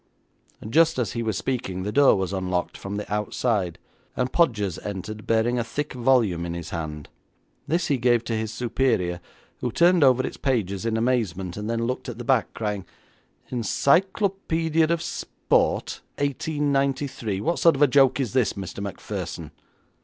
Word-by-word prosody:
Just 160 +6 +4
as 120 -6 0
he 115 - -3
was 110 -4 -1
speaking 115 -8 -3
the 105 - -2
door 140 +5 +5
was 95 0 -2
unlocked 90 -2 -2
from 100 +1 -6
the 105 0 -4
outside, 105 -3 -1 0.4
and 125 +1 0
Podgers 105 - +1
entered, 105 +1 -6
bearing 115 +2 +2
a - - +1
thick 145 +6 -4
volume 120 -9 +2
in 85 0 -4
his 85 -1 -6
hand. 75 -3 -5 0.6
This 170 +4 +1
he 140 -4 0
gave 120 -1 +3
to 115 - -2
his 110 0 -2
superior, 115 -7 0 0.4
who 125 - -2
turned 170 +4 +4
over 130 -1 +4
its - - -5
pages 110 -6 -1
in 110 -1 0
amazement, 105 -7 0
and 105 +1 -5
then 115 0 0
looked 125 +2 -3
at - - -6
the - - -6
back, - - +2
crying, 105 -3 -2 0.7
'Encyclopaedia 165 - +1
of 170 0 0
Sport, - - -1 0.2
1893! 140 -6 -1
What 170 +11 0
sort 165 -3 +5
of 140 - +3
a - - +7
joke 135 0 +4
is 125 -6 -1
this, 130 -4 +2
Mr. 95 0 -6
Macpherson?' 100 -2 -5
115 Hz, 165 wpm, -25 LUFS, 100-140 Hz, 0.7 s, a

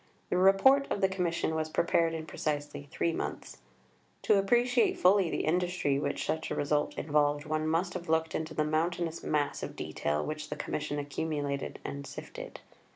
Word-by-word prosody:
The - - +2
Report 195 +10 +5
of - - -1
the 190 - +4
Commission 175 -4 -1
was 160 0 -1
prepared 165 0 +2
in 160 -1 -5
precisely 145 -2 -3
three 165 - 0
months. - - -5 0.6
To 205 - +4
appreciate 240 +4 +3
fully 185 -1 +4
the - - -1
industry 175 -4 +1
which - - -2
such 160 0 -2
a - - -2
result 145 +1 0
involved, 145 0 +1
one 155 0 -1
must 165 +3 0
have 170 - -6
looked 160 0 +1
into 160 0 -3
the 155 - +2
mountainous 165 +2 -1
mass 145 -2 -1
of - - -6
detail 75 +1 -2
which 155 0 -5
the 150 - -3
Commission 150 -1 -3
accumulated 145 -1 -3
and 140 0 -5
sifted. - - -8
160 Hz, 170 wpm, -30 LUFS, 150-180 Hz, 0.6 s, Report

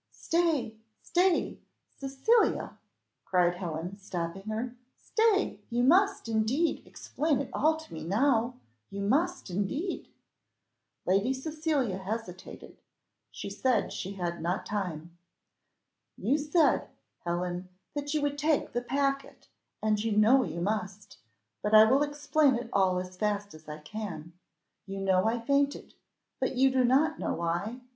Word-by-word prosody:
"Stay, 320 -10 0 0.2
stay! 355 +1 +1 0.4
Cecilia," 275 - +1 0.4
cried 180 -1 +2
Helen, 175 +1 -5
stopping 180 -2 -4
her; 230 +3 -3 0.2
"stay! 440 -3 +1
you 240 0 +1
must, 385 - +4
indeed, 230 +9 +1
explain 300 -2 -1
it 280 - -4
all 315 +2 +2
to 315 - -12
me 160 -1 -6
now 235 - +2 0.3
you 200 - -6
must 285 - 0
indeed!" 275 - -2 1.0
Lady 195 +7 +2
Cecilia 295 - -1
hesitated 190 -2 -7 0.5
said 250 -6 -1
she 195 - -5
had 175 -3 -3
not 175 +5 -1
time. 170 -5 -4 1.0
"You 290 - +1
said, 305 +2 +2 0.3
Helen, 175 +1 -3 0.2
that 290 0 -3
you 300 - +1
would 285 0 -1
take 305 0 +1
the 240 - 0
packet, 275 +2 -2 0.3
and 215 -1 +1
you 220 -2 0
know 230 +6 +6
you 170 -5 -4
must; 200 0 -3 0.4
but 210 +1 +2
I 215 - +10
will 265 +5 +4
explain 290 -1 +2
it 235 -1 -5
all 190 -2 +3
as 180 0 -5
fast 205 0 -1
as 155 0 -13
I 150 - -5
can. 170 -1 -7 0.5
You 195 0 -5
know 190 +1 +2
I 235 +2 +1
fainted, 280 +4 0 0.5
but - - -1
you 265 +1 +4
do 260 -1 +3
not 285 +6 +3
know - - -1
why? 175 +9 -2
225 Hz, 135 wpm, -29 LUFS, 185-285 Hz, 1.0 s, I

